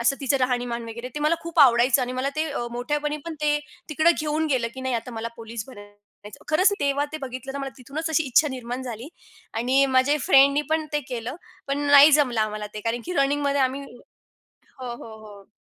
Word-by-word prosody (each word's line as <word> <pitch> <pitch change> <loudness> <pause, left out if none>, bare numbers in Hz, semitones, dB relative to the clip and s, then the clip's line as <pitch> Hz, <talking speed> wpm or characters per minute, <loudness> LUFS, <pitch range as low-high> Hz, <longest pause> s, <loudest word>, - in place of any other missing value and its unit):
असं 245 +4 +2
तिचं 275 0 +1
राहणीमान 245 -2 -1
वगैरे, 235 +2 -7
ते 295 - -4
मला 305 +3 +3
खूप 335 0 -6
आवडायचं 250 0 +5
आणि 250 0 -3
मला 255 +2 -1
ते 310 - +1
अ, 240 -4 -3
मोठ्यापणी 295 +5 -2
पण 330 - -4
ते 295 0 +2 0.3
तिकडं 315 +2 +3
घेऊन 310 +1 -1
गेलं, 250 -4 +1
की 260 - -7
नाही 260 -1 -2
आता 230 +2 -4
मला 225 +1 -4
पोलीस 225 -1 -7
बनयाचं. 205 -2 -15
खरंच, 370 +6 +4
तेव्हा 280 0 +1
ते 310 - -4
बघितलं 260 0 -6
तर 280 - -5
मला 275 -1 -4
तिथूनच 300 +6 -5
अशी 320 0 +2
इच्छा 295 +4 +3
निर्माण 250 0 -5
झाली 240 +1 -7 0.5
आणि 255 +4 +3
माझ्या 260 +2 +3
फ्रेंडनी 280 +2 +5
पण 315 -1 0
ते 295 - +1
केलं, 245 +2 -5 0.3
पण 275 +1 -1
नाही 285 +1 +9
जमलं 255 -6 +3
आम्हाला 215 -1 -2
ते 210 - -5
कारण 230 +1 -1
की 360 - -3
रनिंगमध्ये 280 -1 +1
आम्ही 260 +2 -1
हो, 245 -3 -16 0.7
हो, 225 -2 -10
हो. 200 -2 -14
260 Hz, 205 wpm, -24 LUFS, 235-290 Hz, 0.7 s, नाही